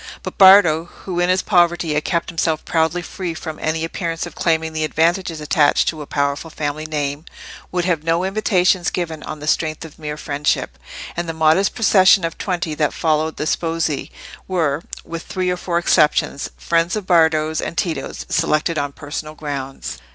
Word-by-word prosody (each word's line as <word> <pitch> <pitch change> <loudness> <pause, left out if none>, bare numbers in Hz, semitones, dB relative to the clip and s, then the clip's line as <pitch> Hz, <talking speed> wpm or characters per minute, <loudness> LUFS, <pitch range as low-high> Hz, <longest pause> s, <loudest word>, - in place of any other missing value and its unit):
But - - -7
Bardo, 190 -5 +7 0.2
who 180 -2 -2
in 175 0 +2
his 185 +1 +2
poverty 175 -3 +2
had 150 0 0
kept 170 -1 -1
himself 160 -2 -1
proudly 165 +2 0
free 175 -2 -5
from 160 -1 -7
any 160 +1 -1
appearance 165 0 -3
of - - -9
claiming 160 -1 0
the 155 0 -1
advantages 165 +2 0
attached 150 -1 +2
to 155 -2 -5
a 145 - -8
powerful 140 +2 -1
family 155 0 -4
name, 145 -1 -3 0.5
would 180 -1 -1
have 170 -4 0
no 165 +2 +1
invitations 190 -2 +2
given 165 -4 -4
on 155 -1 -7
the - - -6
strength 155 0 0
of 160 0 -13
mere 150 -1 -5
friendship; 145 - -2 0.4
and 170 0 -3
the - - -2
modest 160 +5 +2
procession 190 -5 +5
of 165 - -5
twenty 175 -4 -2
that 150 -1 0
followed 155 -1 0
the - - -2
sposi 165 -2 -1 0.4
were, 160 -5 0 0.2
with 165 0 -6
three 185 0 -2
or 180 - -1
four 175 -1 -2
exceptions, 150 -4 +2
friends 170 +2 +1
of 210 -3 -4
Bardo's 160 -3 +3
and 170 - -5
Tito's 160 -7 -3
selected 165 0 +1
on 145 0 -3
personal 150 +1 -6
grounds. 135 - -5
160 Hz, 180 wpm, -20 LUFS, 155-175 Hz, 0.5 s, Bardo